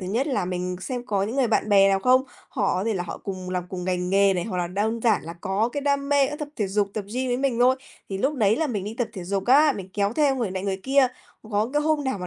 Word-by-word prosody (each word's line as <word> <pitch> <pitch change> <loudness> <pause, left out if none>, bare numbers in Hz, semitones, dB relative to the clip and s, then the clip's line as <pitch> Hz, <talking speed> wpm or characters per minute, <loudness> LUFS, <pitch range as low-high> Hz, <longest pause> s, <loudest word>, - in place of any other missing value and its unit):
thứ 185 - -5
nhất 235 +8 0
là 265 - 0
mình 180 0 -3
xem 245 +3 -4
có 200 -4 0
những 225 +6 -3
người 265 -3 +3
bạn 220 -1 +1
bè 195 -1 +6
nào 195 0 +2
không? 255 +5 +4 0.3
Họ 205 -6 0
có 185 +3 -1
thể 225 -2 0
là 175 - -1
họ 175 - -7
cùng 185 -2 -6
làm 180 -1 -2
cùng 180 -1 -5
ngành 180 0 -1
nghề 195 0 +4
này, 175 - -1
hoặc 185 -5 -3
là 175 - 0
đơn 215 +5 -1
giản 220 -5 +3
là 165 - -7
có 200 +5 0
cái 285 +3 -4
đam 280 0 0
mê, 285 -1 +4
ơ, 295 +2 -5
tập 300 -2 -5
thể 210 - 0
dục, 200 +1 0
tập 210 -2 -3
gym 255 0 -1
với 245 - +1
mình 260 -3 0
thôi, 255 +1 +5 0.3
thì 195 -1 -4
lúc 280 +7 0
đấy 220 -3 +2
là 320 - 0
mình 205 -7 -3
đi 215 +2 -5
tập 235 -2 0
thể 185 -5 -7
dục 195 +1 -2
á, 290 +3 +6
mình 190 -2 -7
kéo 200 +1 +1
theo 280 -1 +2
người 230 -6 -1
này 185 0 -4
người 195 -1 -2
kia. 270 0 +4 0.4
Có 210 +3 0
cái 295 0 +1
hôm 305 -2 +1
nào 260 -7 -1
mà 180 - -5
210 Hz, 310 wpm, -24 LUFS, 190-260 Hz, 0.4 s, bè